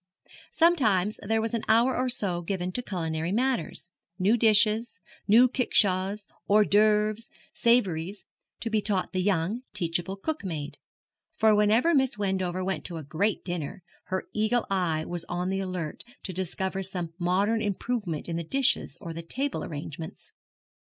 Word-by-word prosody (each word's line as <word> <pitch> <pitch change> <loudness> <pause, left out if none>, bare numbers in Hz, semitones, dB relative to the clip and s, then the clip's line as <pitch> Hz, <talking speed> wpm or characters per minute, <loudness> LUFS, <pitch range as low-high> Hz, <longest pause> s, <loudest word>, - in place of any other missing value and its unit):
Sometimes 220 - +3
there 220 +2 0
was 225 - -2
an 230 - 0
hour 235 +4 +4
or 255 +1 0
so 185 -7 +1
given 180 +1 -3
to 245 - -1
culinary 165 -6 -3
matters 230 -7 -1 0.3
new 200 +5 +3
dishes, 220 -1 +3 0.3
new 235 +5 +7
kickshaws, 200 -5 +1 0.2
hors 210 +1 +6
d'oeuvres, 215 +2 +3 0.2
savouries 195 -5 +1 0.4
to 230 - -2
be 215 -1 +2
taught 195 -3 -1
the 185 - 0
young, 195 +4 0
teachable 175 +2 -1
cook 310 +10 -4
maid; 155 -6 -5 0.6
for 220 -4 +5
whenever 215 +10 +4
Miss 265 -5 +2
Wendover 190 -2 -1
went 190 +1 -2
to 170 - -5
a 160 - -6
great 175 +9 -1
dinner, 175 -1 -4 0.2
her 185 0 -2
eagle 220 +3 +1
eye 165 -5 0
was 175 -1 -3
on 180 +1 -2
the 195 - -1
alert 180 -5 -4 0.2
to 185 - -4
discover 190 +1 -2
some 180 -3 -4
modern 195 +6 +1
improvement 205 -5 -2
in 165 -1 -2
the 170 - -3
dishes 270 +10 +1
or 170 -4 -6
the 165 - -6
table 270 +11 -3
arrangements. 160 +1 -7
195 Hz, 155 wpm, -27 LUFS, 175-220 Hz, 0.6 s, new